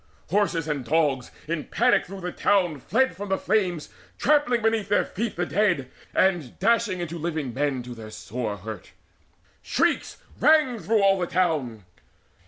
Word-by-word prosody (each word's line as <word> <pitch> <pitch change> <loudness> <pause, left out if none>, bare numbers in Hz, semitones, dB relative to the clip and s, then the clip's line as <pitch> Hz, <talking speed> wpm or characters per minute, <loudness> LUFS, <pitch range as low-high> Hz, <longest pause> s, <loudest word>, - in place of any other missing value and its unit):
Horses 185 -5 +1
and 145 -4 -2
dogs 140 -2 +1 0.2
in 160 -2 -2
panic - - +2
through 195 +1 -8
the 180 0 -3
town 175 -8 +1
Fled 260 - +1
from 200 +2 -6
the 190 - +1
flames, 185 - 0 0.3
trampling 280 -6 +2
beneath 225 -2 +1
their 205 - +3
feet 225 +3 -4
The 175 - -1
dead, 175 -10 +1 0.2
and 175 -10 +1
dashing 215 -3 +1
into 170 0 -5
living 155 -6 -3
men 135 -1 -1
To 125 0 -8
their 110 -2 -9
sore 110 0 -5
hurt. 105 0 -9 0.7
Shrieks - - 0 0.2
rang 285 -3 +4
through 215 0 +1
all 195 -1 +4
the 175 - -1
town. 150 - -1
175 Hz, 160 wpm, -25 LUFS, 140-205 Hz, 0.7 s, rang